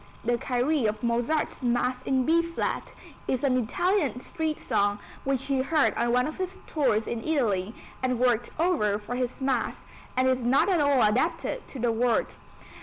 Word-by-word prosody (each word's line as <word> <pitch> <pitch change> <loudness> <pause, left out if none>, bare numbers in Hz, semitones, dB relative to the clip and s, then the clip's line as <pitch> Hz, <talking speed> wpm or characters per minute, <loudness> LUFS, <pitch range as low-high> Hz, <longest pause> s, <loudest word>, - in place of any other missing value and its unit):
The 240 0 +1
Kyrie 255 +1 +1
of 215 +3 -3
Mozart's 240 +8 0
Mass 250 +1 0
in 260 -1 +1
B 330 +2 +4
flat 335 0 -3 0.3
is 255 0 -1
an 265 -2 +3
Italian 275 - +1
street 315 +4 -3
song 205 0 +1 0.3
which 270 -1 0
he 270 -2 +1
heard 305 +2 +2
on 235 0 0
one 250 +1 +3
of 310 - -5
his 375 0 -4
tours 240 -8 +1
in 230 -1 -3
Italy 220 -10 0 0.3
and 255 -1 0
worked 245 -2 +2
over 300 - +2
for 215 +4 -6
this 250 +1 -3
Mass, 265 -3 -1 0.3
and 255 0 +3
is 260 -1 +2
not 250 +9 +3
at 355 -5 +3
all 285 -4 +4
adapted 320 - 0
to - - -9
the 240 -1 +1
words. 235 +1 0
255 Hz, 180 wpm, -27 LUFS, 235-300 Hz, 0.3 s, B